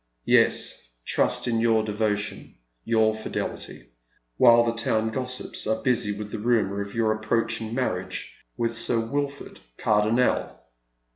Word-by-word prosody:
" - - -47
Yes. - - 0 0.2
trust - - +1
in 115 -2 +1
your 115 -1 +3
devotion, 105 -1 -2 0.3
your 110 -1 +3
fidelity, 110 - -6 0.5
while 120 -1 +7
the 115 0 0
town 110 -1 0
go 130 +3 -2
^sips 125 -3 -4
are 110 0 -1
busy 120 -5 +2
with 105 0 -6
the - - -4
rumour 105 -3 +1
of 100 +2 -7
your 115 -1 +2
approaching 110 +1 -1
marriage 95 -8 -3 0.2
•with 115 0 0
Sir 115 +1 -1
WiU'ord 140 +5 -3 0.2
Cardonnel." 110 +4 +1
110 Hz, 140 wpm, -25 LUFS, 105-115 Hz, 0.5 s, while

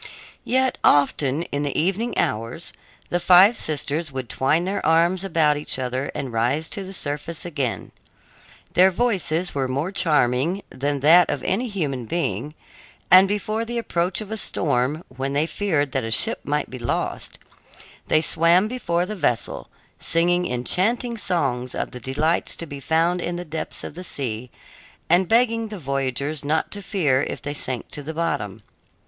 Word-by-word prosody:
Yet 260 +1 +1
often, 145 +1 +3
in 145 - 0
the 145 -1 -1
evening 195 +8 -1
hours, 115 +10 -2 0.4
the 175 - +1
five 185 +6 +7
sisters 155 -2 -2
would 130 -3 -5
twine 150 +6 +1
their 195 +2 -2
arms 170 +3 +3
about 160 -5 +2
each 150 - -1
other 130 +1 -3
and 130 -4 -4
rise 125 +8 0
to 200 - -4
the 190 - -8
surface 150 -2 -4
together. 140 -8 -3 0.8
Their 185 +2 +6
voices 185 -5 0
were 135 -2 -1
more 140 +8 -2
charming 155 +1 +1
than 140 +1 -2
that 165 +4 +6
of 140 - -2
any 235 +7 0
human 145 - -3
being, 150 - -2 0.6
and 185 +2 +9
before 215 +2 -2
the 235 +1 -4
approach 180 -4 -1
of 215 0 -8
a 220 - -2
storm, 145 - 0
when 135 +2 -4
they 145 +2 +2
feared 160 -6 -1
that - - -1
a 115 - -3
ship 115 - +3
might 150 0 -2
be 130 - -7
lost, 120 - -3 0.7
they 155 - +3
swam 170 +5 +4
before 180 -8 -1
the 215 - -5
vessel, 120 - -2 0.3
singing 175 +1 +1
enchanting 215 - +1
songs 135 - -1
of - - -3
the 125 - -7
delights 145 +7 0
to 170 - -6
be 145 -3 -8
found 165 +4 +1
in 175 - -2
the 175 0 -5
depths 160 0 -4
of - - -7
the 180 +4 -8
sea 125 -7 -4 0.6
and 180 +1 +4
begging 230 -1 +3
the 210 -1 -7
voyagers 140 0 -2
not 155 +2 0
to 205 - -4
fear 155 -10 +1
if - - -4
they 145 - -5
sank 130 -4 -4
to 145 - -6
the 155 +3 -7
bottom. 105 - -2
160 Hz, 170 wpm, -23 LUFS, 135-185 Hz, 0.8 s, and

